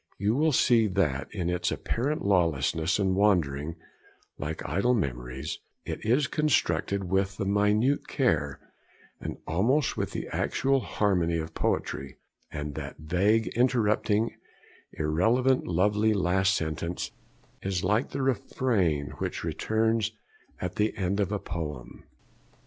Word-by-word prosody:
You 105 +2 +1
will 155 +3 +3
see 115 -4 +4
that, 85 -9 0
in 90 -5 -3
its 90 0 0
apparent 140 +4 -2
lawlessness 85 -2 +2
and 95 -2 +1
wandering 80 -7 +2 0.6
like 75 +3 -4
idle 100 - +2
memories, 65 - -3 0.3
it - - -5
is 125 +6 +3
constructed 125 -9 +1
with 95 +1 0
the 100 - -2
minute 105 +7 +2
care, 75 - 0 0.6
and - - -5
almost 120 - +1
with - - -1
the - - -5
actual 135 0 +1
harmony, 90 -8 +1
of 80 0 -4
poetry; 65 -1 -2 0.3
and 75 -1 -5
that - - -6
vague, 95 +8 +2
interrupting, 115 -3 +2 0.6
irrelevant, 115 +13 +2
lovely 105 +5 +2
last 95 0 +2
sentence 80 +2 -3 0.5
is 95 -2 -2
like 105 +7 +1
the 140 0 -3
refrain 100 - 0
which - - -3
returns 110 0 0 0.5
at 90 +3 -4
the 105 +1 +1
end 100 +1 0
of 100 0 0
a 105 - +1
poem. 75 -10 -6
100 Hz, 125 wpm, -28 LUFS, 80-110 Hz, 0.6 s, see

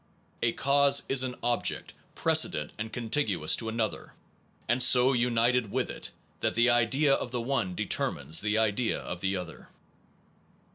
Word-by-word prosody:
A 115 0 +1
cause 140 0 +2
is 135 -1 +3
an 130 -1 -2
object 120 0 -2 0.2
precedent 75 0 +1
and 110 +1 -5
contiguous 110 - 0
to 110 - -5
another, 110 -1 -4 0.5
and 120 +1 +1
so 125 +2 +5
united 120 -1 +1
with 130 +1 -2
it - - -6 0.3
that - - -2
the 120 +2 +4
idea 135 +5 +2
of 125 - -2
the 125 0 -3
one 115 -7 -2
determines 75 0 0
the 105 +1 0
idea 110 +1 0
of 90 0 -7
the 95 0 -1
other. 90 -3 -9
120 Hz, 150 wpm, -28 LUFS, 105-125 Hz, 0.5 s, so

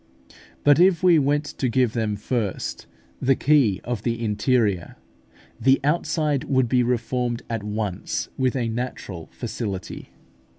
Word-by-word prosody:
But 145 +1 +5
if 180 -1 +4
we 175 -3 +6
were 145 +1 +2
to 145 -3 -3
give 125 -1 +2
them 110 -3 -1
first 105 -1 -3 0.3
the 135 +1 +3
key 135 -10 +3
of 120 -3 -3
the 115 0 -2
interior, 105 -3 +1 0.6
the 135 +1 +4
outside 150 -2 0
would 130 -3 +2
be 125 +2 +3
reformed 120 0 -1
at 115 -2 -2
once 105 -3 -3
with 130 -1 0
a 120 -3 0
natural 110 -7 -5
facility. 105 -6 -5
125 Hz, 135 wpm, -23 LUFS, 110-135 Hz, 0.6 s, we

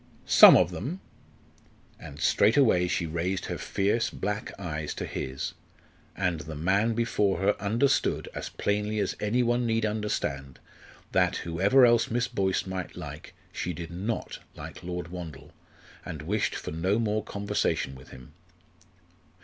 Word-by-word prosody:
"Some - - +9
of 90 - +2
them." 130 - -5 1.0
And 75 0 -10
straightway 100 - +4
she 85 - -1
raised 85 +4 -2
her - - -4
fierce 105 +4 0
black 105 +1 -3
eyes 75 -5 -4
to - - -4
his, 65 +1 -4 0.6
and 90 -4 0
the 75 +1 -7
man 100 +9 +1
before 105 -4 +1
her 100 +2 +2
understood, 120 +7 +1
as - - -5
plainly 105 +1 -1
as 100 -3 -1
any 115 +4 +1
one 120 0 +1
need 115 -1 +1
understand, 105 -11 -2 0.5
that, - - +2
whoever 100 +10 +4
else 120 -1 +4
Miss 120 +2 0
Boyce 95 -6 0
might 95 -1 -5
like, 75 -4 -9 0.2
she 90 - -3
did 85 0 -7
not 100 +6 -4 0.2
like - - -9
Lord 90 -1 -5
Wandle, 85 -6 -8 0.5
and 75 -2 -7
wished 105 +6 -1
for - - -5
no 90 +6 0
more 110 -2 0
conversation 100 -9 -1
with 65 -1 -13
him. 65 -1 -13
95 Hz, 145 wpm, -28 LUFS, 85-110 Hz, 1.0 s, Some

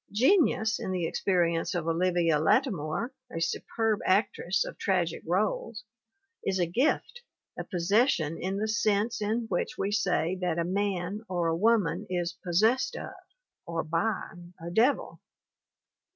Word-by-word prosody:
Genius, 230 - +3
in - - -4
the 180 -2 -1
experience 170 -1 0
of 170 -2 -2
Olivia 170 -2 +2
Lattimore, 190 - +1 0.2
a - - -4
superb 220 +6 -1
actress 190 -2 +1
of - - -7
tragic 175 -4 0
roles, 210 +4 -1 0.6
is 195 -1 0
a 180 - +2
gift, 270 - 0 0.3
a - - -4
possession 180 - +1
in 190 +3 -3
the 215 +2 -1
sense 215 0 +1
in 215 +3 0
which 175 - -2
we 195 - -1
say 185 -4 +1
that 175 -2 0
a 170 - +1
man 195 +1 -2
or 175 -2 0
a 165 - +1
woman 205 -1 +2
"is 175 -2 -2
possessed 215 +9 +2
of" - - -6 0.5
or 165 -1 -2
by 170 +7 -1 0.4
a 170 +1 -6
devil. 235 +9 +1
190 Hz, 140 wpm, -28 LUFS, 170-215 Hz, 0.6 s, Genius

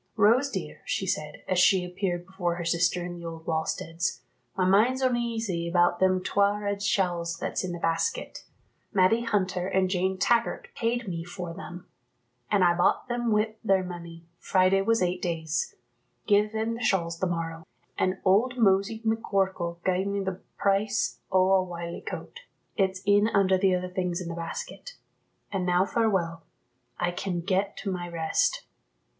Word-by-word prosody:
"Rose, 230 +6 +4
dear," - - -5
she - - -2
said, - - -3
as 185 -1 +1
she 185 0 +5
appeared 180 -1 -3
before 180 -3 -2
her 175 -1 -5
sister 175 +1 +1
in 175 - -5
the 170 -1 -9
old 165 -1 -7
wallsteads, 165 +1 -2 0.4
"my 185 - +2
mind's 230 +8 +3
oneasy 230 -8 0
about 175 0 +3
them 185 -1 +3
twa' 200 +2 +2
red 200 -1 -2
shawls 175 -4 0
that's - - -2
in 185 - -3
the 175 - -4
basket. 170 - -1 0.5
Matty 205 +3 +4
Hunter 185 -5 0
and 185 -1 +1
Jane 190 0 0
Taggart 240 - +1
paid 235 0 -1
me 165 -3 -3
for 175 -1 -6
them, 175 -1 -9 0.6
an' 200 -3 +3
I 175 -1 +5
bought 175 +7 +2
them 240 -1 0
wi' 215 +1 +2
their 195 -3 +3
money, 170 -2 -8
Friday 190 +1 +3
was 225 0 +2
eight 180 0 -1
days. 160 -3 -2 0.5
Gie 210 0 +4
them 220 +1 -2
the 230 - -6
shawls 170 -5 +1
the 185 - +1
morrow. 165 -1 -3 0.3
An' 185 0 0
old 225 +7 +3
Mosey 205 +1 +2
McCorkell 190 -6 -1
gied 185 +1 +1
me 200 0 -1
the 190 -1 -4 0.2
price 200 +1 +1
o' 185 0 +4
a 190 -1 +5
wiley 170 -1 -6
coat; 480 - -7 0.4
it's 190 -2 0
in 205 +1 +5
under 195 -3 +3
the 185 0 +3
other 180 0 -2
things 180 -1 -2
in 175 -2 -5
the - - -4
basket. 170 - -6 0.6
An' 195 -2 -1
now 180 +1 +3
farewell; 190 -7 0 0.6
I 175 0 +1
can 175 -1 -3
get 195 +3 0
to 200 - -2
my 175 -1 -4
rest." 165 -2 0
185 Hz, 170 wpm, -27 LUFS, 175-205 Hz, 0.6 s, she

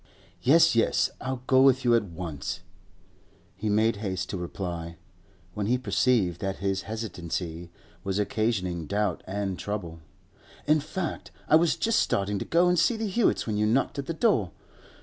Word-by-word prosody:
'Yes, 160 +1 +5
yes; 115 - +2
I'll 130 -1 -4
go 130 0 +5
with 130 -1 +4
you 120 - +5
at 115 - +5
once,' 85 -6 -5 0.9
he 105 +3 -3
made 110 +1 +2
haste 95 -3 -3
to 95 - -3
reply, 85 -2 -5 0.6
when 105 +1 -2
he 125 +3 +2
perceived 120 -8 +1
that 95 0 -2
his 95 0 -1
hesitancy 90 -5 -4 0.3
was 95 0 -2
occasioning 100 -6 -1
doubt 100 -3 -1
and 95 -1 -3
trouble. 90 -6 -5 0.7
'In 155 +1 +4
fact, 170 +3 -4 0.2
I - - +5
was 165 0 +4
just 230 0 +1
starting 100 0 0
to - - -4
go 170 +2 +3
and 180 -1 +3
see 225 +8 +2
the 220 - -2
Hewetts 215 +4 +1
when 110 -2 -2
you 105 0 +2
knocked 125 +5 +1
at 140 - -5
the 165 - -2
door. 160 - +2
105 Hz, 170 wpm, -27 LUFS, 95-130 Hz, 0.9 s, Yes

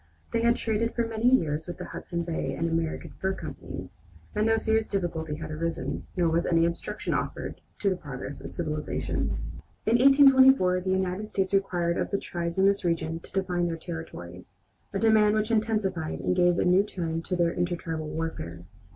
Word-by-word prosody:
They 230 - +2
had 235 0 +4
traded 225 +1 -1
for 235 - +1
many 225 +1 +2
years 160 - +2
with 175 - -6
the - - -6
Hudson 170 -1 -4
Bay 165 -1 -2
and 165 - -1
American 165 -1 -2
Fur 190 0 0
companies, - - -8 0.3
and 215 +1 +1
no 225 0 +4
serious 220 0 +1
difficulty 165 -5 -2
had 155 0 -6
arisen, 165 +2 -3
nor 175 -2 +3
was 165 +1 +2
any 165 -1 +4
obstruction 170 0 -3
offered - - -3 0.2
to 200 - +3
the - - +1
progress 140 -4 -7
of - - -7
civilization. 155 -3 -2 0.5
In 230 +2 +4
1824 265 -8 +6
the 185 - -3
United 190 +2 0
States 195 -1 -1
required 175 -3 +1
of - - -1
the 200 - 0
tribes 170 -2 -4
in 190 - +4
this 200 0 +3
region 165 -1 -1
to - - -13
define 180 -2 0
their 165 -1 -2
territory, 160 - -8 0.4
a 195 - -2
demand 215 0 +4
which 215 +1 0
intensified 210 -7 0
and 180 - 0
gave 175 -1 +4
a - - +2
new 180 +2 +5
turn 170 -5 -3
to 180 - -2
their 170 -1 +2
intertribal 165 -3 -2
warfare. 90 - -5
180 Hz, 185 wpm, -27 LUFS, 165-210 Hz, 0.5 s, 1824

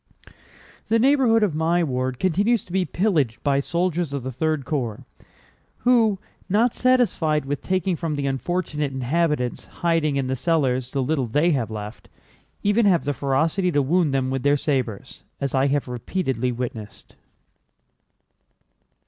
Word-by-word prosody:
"The 225 - +3
neighborhood 245 -3 +4
of 195 -7 +1
my 165 +3 +1
ward 130 -3 -2
continues 200 - +1
to - - -15
be 190 -1 +1
pillaged 160 - 0
by 140 -1 +2
soldiers 170 0 -1
of 140 -3 -3
the 130 - -4
3rd 155 +1 -1
Corps 125 -8 -3 0.8
who, 230 -5 +3 0.3
not 225 +5 +3
satisfied 205 - +2
with 145 +1 -3
taking 185 -1 0
from 160 -2 -3
the 140 -1 -2
unfortunate 150 +1 -2
inhabitants 130 0 -1
hiding 165 -4 0
in 135 -1 0
the 130 +1 -1
cellars 130 -4 0
the 135 0 -1
little 135 -2 0
they 150 +9 +2
have 125 -8 0
left, 105 0 -8 0.5
even 205 +2 +3
have 175 -4 +3
the 145 - 0
ferocity 160 +8 0
to 145 -3 +2
wound 165 +2 +2
them 130 -1 0
with 135 -1 -1
their 145 +2 +3
sabers, 130 -8 -3 0.2
as 140 -1 -2
I 135 0 +3
have 140 0 0
repeatedly 125 0 -2
witnessed." 115 -4 -7
150 Hz, 150 wpm, -23 LUFS, 130-180 Hz, 0.8 s, neighborhood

